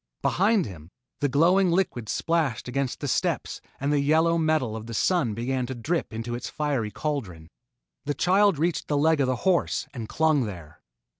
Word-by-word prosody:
Behind 200 +2 +2
him, 85 -7 -10 0.3
the 145 - +1
glowing 180 +7 +4
liquid 170 - 0
splashed 155 -11 0
against 130 0 -2
the 145 - -2
steps - - -1 0.2
and 140 +2 0
the 145 - +3
yellow 160 +4 +3
metal 155 -8 +1
of 110 0 -7
the 115 - -6
Sun 140 - +1
began 125 +2 -2
to 130 - -5
drip 155 +8 -2
into 115 +2 -5
its 120 +1 -4
fiery 140 -8 -1
cauldron. 100 - -4 0.5
The 145 0 -1
child 190 +3 +3
reached 165 +3 -1
the 145 - 0
leg 155 0 +3
of 135 - +2
the 130 - +1
horse 185 -3 +1
and 115 -5 -6
clung 155 -5 +2
there. 85 -7 -9
140 Hz, 180 wpm, -26 LUFS, 115-165 Hz, 0.5 s, glowing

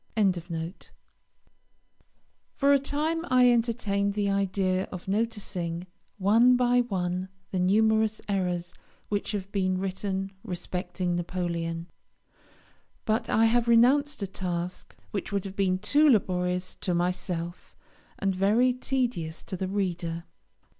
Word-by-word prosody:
] - - -38 2.4
For 280 0 +4
a 280 - +5
time 305 +4 -1
I 250 -1 +6
entertained 210 -4 0
the 205 -1 +1
idea 190 -1 +1
of 185 -1 -9
noticing, 190 -5 -2 0.3
one 230 +6 +5
by 245 0 +4
one, 185 -4 -2 0.2
the 185 - -1
numerous 220 +3 +3
errors 180 -3 -1 0.4
which 205 0 -1
have 200 -1 -4
been 185 -2 +1
written 195 0 -3
respecting 180 0 -3
Napoleon; 170 -1 -3 1.2
but 225 +1 0
I 225 - +4
have 235 +1 +3
renounced 260 +3 +4
a - - -2
task 180 -1 -4 0.2
which 200 - -4
would 200 -1 -1
have 195 0 -6
been 190 -2 +2
too 290 +10 +4
laborious 180 -5 +1
to 180 - 0
myself, 175 -1 -3 0.4
and 195 -1 0
very 215 +7 +3
tedious 245 -11 -2
to - - -5
the 185 +1 -3
reader. 175 -4 -2
195 Hz, 120 wpm, -27 LUFS, 180-225 Hz, 2.4 s, I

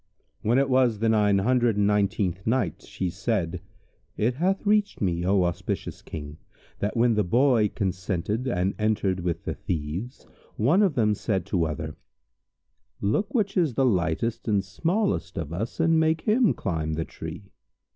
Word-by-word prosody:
When 115 +4 +2
it 140 0 +3
was 130 -4 +3
the 115 +2 +1
Nine 105 -2 +3
Hundred 120 +1 +2
and 100 - +3
Nineteenth 100 -2 0
Night, 115 - 0
She 90 -2 -4
said, 90 -5 -2 0.6
It 115 +4 +1
hath 185 - 0
reached 210 0 +2
me, 85 -3 0
O 95 +1 +3
auspicious 85 -1 -3
King, 75 0 -8 0.4
that 105 +4 -2
when 120 0 +4
the 105 -1 +2
Boy 120 +1 +3
consented 95 +4 -2
and 95 -5 0
entered 105 -3 +1
with 85 -2 -2
the - - -2
Thieves, 85 - -4 0.3
one 150 - +3
of 190 -7 +2
them 105 -3 +3
said 100 -3 -2
to 90 -5 0
other 75 0 -5 1.0
"Look 110 - 0
which 205 -4 +1
is 165 - +1
the 135 - +3
lightest 95 +1 0
and 100 -3 +1
smallest 170 - -1
of 85 -2 -4
us 110 +7 -4
and 165 0 +4
make 160 0 +2
him 225 +2 +3
climb 80 -5 -2
the 80 +1 -2
tree." 85 +5 -9
105 Hz, 165 wpm, -26 LUFS, 90-130 Hz, 1.0 s, when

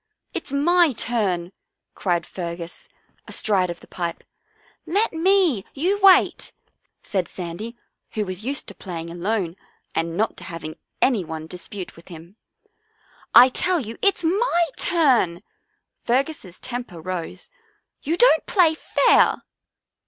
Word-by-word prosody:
" - - -50
It's - - -5
my 335 +2 +4
turn," 200 -6 -1 0.4
cried 175 -3 -1
Fergus, 170 -1 -7 0.4
astride 190 -4 +1
of 170 - -6
the - - -15
pipe. 170 -2 -4 0.3
" - - -34
Let 440 -1 +2
me. 335 - +3
You 365 +8 +1
wait," 385 -1 +5 0.5
said 190 -5 -1
Sandy, 190 +7 -6 0.4
who 215 -1 -1
was 185 +1 -6
used 275 +3 -3
to - - -8
playing 170 -3 -7
alone 180 0 -2 0.4
and 165 +1 -2
not 220 +2 0
to - - -8
having 165 -2 -7 0.2
any 235 -8 +3
one 160 -1 -6
dispute 180 +2 -8
with 165 - -17
him. 170 +2 -12 1.0
"I 250 +2 +10
tell 355 +7 +2
you 230 -4 -7
it's 395 -3 +2
my 345 -1 +2
turn!" 255 - +2 0.6
Fergus' 255 - -1
temper 240 -9 -6
rose. 180 - -6 0.2
" - - -48
You 325 +4 -1
don't 480 -9 +5
play 350 -5 +4
fair." 315 - +3
210 Hz, 135 wpm, -23 LUFS, -, 1.0 s, I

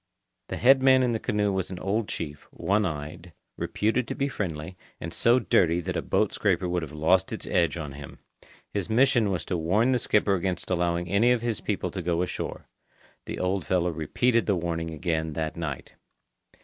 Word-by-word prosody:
The - - -4
head 130 +2 +5
man 130 -1 +5
in 125 - +2
the 110 - -1
canoe 105 -4 0
was 95 -2 -2
an 95 - -6
old 100 +4 -1
chief, 75 -3 -5
one 105 0 0
eyed, 80 +2 -7 0.2
reputed 115 +4 0
to - - -4
be 140 +1 -1
friendly, 85 - -4 0.2
and 85 - -6
so 120 +2 +4
dirty 90 -8 +3
that - - -4
a - - 0
boat - - +1
scraper 90 - +1
would 90 0 0
have 80 - -6
lost 80 +5 +2
its - - -5
edge 85 -1 +1
on 75 -4 -5
him. 70 0 -10 0.6
His 100 -4 -2
mission 120 -2 +3
was 90 -5 -2
to 90 - -1
warn 100 +10 +2
the 125 - +2
skipper 105 -3 +2
against 95 0 -2
allowing 85 -1 0
any 100 +7 +3
of 125 -2 +2
his 115 -3 -2
people 105 - -2
to 95 - -4
go 85 0 0
ashore. 90 - -5 0.6
The - - -4
old 90 0 -1
fellow 90 -1 +1
repeated 115 +10 +1
the 100 - +3
warning 85 -1 -2
again 80 -1 -2
that 80 0 -3
night. 80 -6 -5
90 Hz, 200 wpm, -26 LUFS, 85-110 Hz, 0.6 s, head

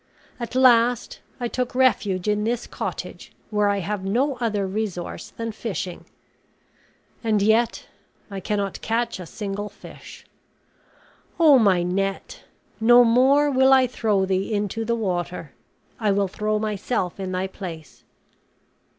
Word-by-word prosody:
At 240 +1 -6
last 245 -2 +3 0.2
I 240 - -1
took 250 +1 -3
refuge 210 -7 +2
in 210 0 +1
this 235 +2 -1
cottage, - - -6 0.2
where 210 -1 +2
I 200 -1 0
have 200 +1 -3
no 255 +8 0
other 215 -5 -1
resource 190 -3 -4
than 230 0 -5
fishing, 195 -5 -5 1.2
and 220 -2 +2
yet 220 +3 +2 0.5
I 195 - -4
cannot 200 0 -3
catch 230 -1 -1
a 180 - -8
single 205 +2 -5
fish. - - -13 1.1
Oh, 300 -5 +7
my 190 -6 +3
net! 195 +2 -3 0.3
no 240 +2 +7
more 265 +5 +4
will 265 0 +4
I 260 -1 +6
throw 215 -5 0
thee 190 +3 -1
into 210 +1 -1
the 235 +1 0
water; 180 -7 -3 0.5
I 215 -3 +1
will 200 0 +1
throw 215 +3 -1
myself 210 -3 -2
in 190 -1 -4
thy 185 +1 -1
place." 175 -5 -9
210 Hz, 135 wpm, -23 LUFS, 195-235 Hz, 1.2 s, Oh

